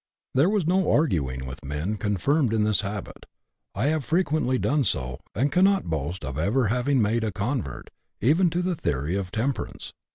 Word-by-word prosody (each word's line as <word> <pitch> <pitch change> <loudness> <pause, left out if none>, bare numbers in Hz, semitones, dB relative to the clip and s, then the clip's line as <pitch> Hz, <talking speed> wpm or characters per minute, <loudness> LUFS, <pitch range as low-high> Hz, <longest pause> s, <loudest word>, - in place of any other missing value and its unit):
There 140 +7 +4
is 185 - 0
no 185 +3 +2
arguing 70 - +1
with 65 +2 -8
men 75 +9 -2
confirmed 110 - +1
in 110 - +2
this 105 -1 +2
habit. 100 -2 -6 0.5
I 105 +6 0
have 155 -3 -1
frequently 155 -5 +1
done 145 +3 +1
so, 65 - -1 0.2
and 135 +6 +1
cannot 190 - +3
boast 80 +4 -3
of 70 +2 -4
ever 110 +7 +2
having 125 +1 +2
made 110 +2 +1
a 110 - -1
convert, 100 - -3 0.3
even 160 - +3
to 175 +2 -1
the 180 -1 0
theory 75 - -1
of 100 -2 -2
temperance. 120 +7 -3
110 Hz, 175 wpm, -25 LUFS, 90-145 Hz, 0.5 s, There